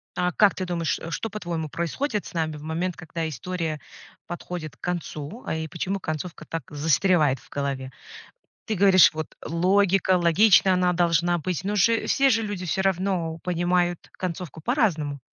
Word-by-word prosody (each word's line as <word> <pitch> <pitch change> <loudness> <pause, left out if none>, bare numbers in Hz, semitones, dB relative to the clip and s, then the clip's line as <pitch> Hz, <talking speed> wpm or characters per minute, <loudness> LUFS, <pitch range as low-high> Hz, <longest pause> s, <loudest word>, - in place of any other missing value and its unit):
А, 180 0 +1
как 205 0 +4
ты 185 - -3
думаешь, 170 -2 -1
что, 225 - -3
по-твоему, 170 -6 -4
происходит 205 - -2
с - - -10
нами 160 -2 -1
в - - -11
момент, 165 +3 -2
когда 165 0 -4
история 160 +2 -4 0.5
подходит 175 -2 -6
к - - -54
концу, 175 - -5
а, - - -2
и 160 0 -3
почему 190 +5 -3
концовка 160 0 -5
так 165 -3 -4
застревает 155 -1 +2
в - - -21
голове? 135 -2 -3 0.7
Ты 220 - -1
говоришь, 185 -4 +6
вот, 155 -1 -4 0.2
логика, 185 +2 +3
логичная 185 +2 +5
она 180 0 +2
должна 175 0 +2
быть, 175 +1 -3
но 205 +2 -1
же 225 +3 +3
все 275 0 +4
же 225 -3 +3
люди 205 -4 -4
всё 185 +4 0
равно 185 -3 0
понимают 175 0 0
концовку 175 -4 -5
по-разному. 165 - 0
175 Hz, 165 wpm, -25 LUFS, 160-190 Hz, 0.7 s, говоришь